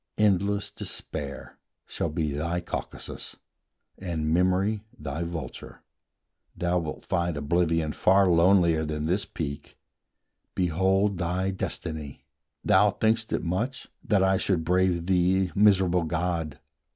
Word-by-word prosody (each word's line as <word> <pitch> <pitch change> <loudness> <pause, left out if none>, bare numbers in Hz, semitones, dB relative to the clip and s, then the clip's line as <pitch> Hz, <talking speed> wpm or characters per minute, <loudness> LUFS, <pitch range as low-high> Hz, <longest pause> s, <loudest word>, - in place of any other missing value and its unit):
Endless 100 -1 +1
despair 70 -1 -6 0.3
shall 85 - -3
be 75 -1 -1
thy 85 +5 -2
Caucasus, 85 - -6 0.6
And 80 -4 -2
memory 95 +4 +2
thy 75 -2 -5
vulture; 85 -1 -6 0.7
thou 90 0 +1
wilt 80 -2 -6
find 85 -2 -1
Oblivion 80 +1 +1
far 95 +5 +4
lonelier 85 -2 +4
than 75 -1 -3
this 90 +6 0
peak, 70 -3 -6 0.8
Behold 95 +2 +1
thy 90 +2 0
destiny! 80 -6 -5 0.4
Thou - - +5
think'st 110 0 0
it - - -1
much 115 +10 -2
That 100 -3 +2
I 95 0 +3
should 90 -4 0
brave 90 -1 +2
thee, 95 0 +2
miserable 95 -4 +4
god! 80 -2 -2
90 Hz, 115 wpm, -27 LUFS, 80-95 Hz, 0.8 s, Thou